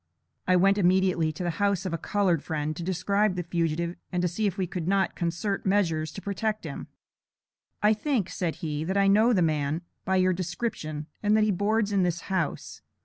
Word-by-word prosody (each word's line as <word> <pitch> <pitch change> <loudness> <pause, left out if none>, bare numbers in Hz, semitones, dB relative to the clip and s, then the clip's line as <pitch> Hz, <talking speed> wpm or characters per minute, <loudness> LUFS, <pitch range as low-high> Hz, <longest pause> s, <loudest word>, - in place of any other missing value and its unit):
I 185 - +4
went 195 +3 +4
immediately 180 -3 +3
to 155 +4 -6
the 175 - 0
house 200 -2 +1
of 185 - -2
a - - 0
colored 185 -4 +1
friend, 155 -1 -3
to - - -6
describe 190 +3 +1
the 180 - -2
fugitive 170 0 -1
and 180 -1 +1
see 205 +5 -1
if 195 0 -3
we 190 - 0
could 175 -1 -5
not 195 0 +1
concert 180 +4 -2
measures 165 -6 +1
to 195 - -8
protect 215 +2 -2
him. - - -6 1.0
"I 210 +1 +6
think," 225 - 0
said 175 -4 -2
he, 150 -1 -2
"that 190 +4 -1
I 200 - +4
know 215 +5 +5
the 185 -7 +3
man, 155 +1 0 0.2
by 190 - 0
your 185 0 +3
description, 175 -4 -4 0.2
and 210 +1 +3
that 215 - +4
he 215 - +3
boards 210 +2 +1
in 200 -2 +2
this 175 -1 0
house. 185 -6 -3
185 Hz, 200 wpm, -27 LUFS, 170-200 Hz, 1.0 s, I